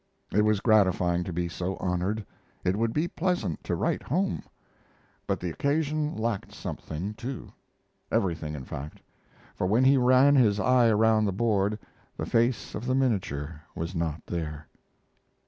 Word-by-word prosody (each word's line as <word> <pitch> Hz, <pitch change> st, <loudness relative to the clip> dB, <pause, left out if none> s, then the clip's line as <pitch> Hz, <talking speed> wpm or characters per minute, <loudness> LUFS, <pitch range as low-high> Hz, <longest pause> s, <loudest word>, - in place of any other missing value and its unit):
It 105 Hz, -, +4 dB
was 105 Hz, -2 st, +2 dB
gratifying 95 Hz, -6 st, +3 dB
to 90 Hz, -, -4 dB
be 85 Hz, +1 st, -1 dB
so 90 Hz, +2 st, -3 dB
honored; 95 Hz, +4 st, -1 dB, 0.4 s
it 90 Hz, -, +1 dB
would 115 Hz, +2 st, +1 dB
be 155 Hz, +7 st, 0 dB
pleasant 175 Hz, -, -1 dB
to -, -, 0 dB
write -, -, 0 dB
home; 185 Hz, +8 st, -1 dB, 0.9 s
but -, -, 0 dB
the 90 Hz, -1 st, -3 dB
occasion 150 Hz, -, 0 dB
lacked 110 Hz, -2 st, -2 dB
something 90 Hz, +7 st, -5 dB
too 120 Hz, +4 st, -7 dB, 0.6 s
everything, 80 Hz, -5 st, 0 dB
in 65 Hz, -3 st, -7 dB
fact 75 Hz, +4 st, -7 dB, 0.5 s
for 90 Hz, -, -1 dB
when 110 Hz, +6 st, +3 dB
he 135 Hz, +1 st, +6 dB
ran 130 Hz, +3 st, +5 dB
his 105 Hz, -6 st, +4 dB
eye 125 Hz, 0 st, +4 dB
around 110 Hz, 0 st, +4 dB
the 100 Hz, -, +1 dB
board 105 Hz, 0 st, +1 dB, 0.4 s
the -, -, -2 dB
face 120 Hz, +1 st, +1 dB
of 115 Hz, +4 st, -5 dB
the 130 Hz, -, +2 dB
minature 85 Hz, -, -1 dB
was 85 Hz, +2 st, -4 dB
not 80 Hz, -2 st, -2 dB
there. 75 Hz, -3 st, -4 dB
105 Hz, 155 wpm, -27 LUFS, 90-125 Hz, 0.9 s, he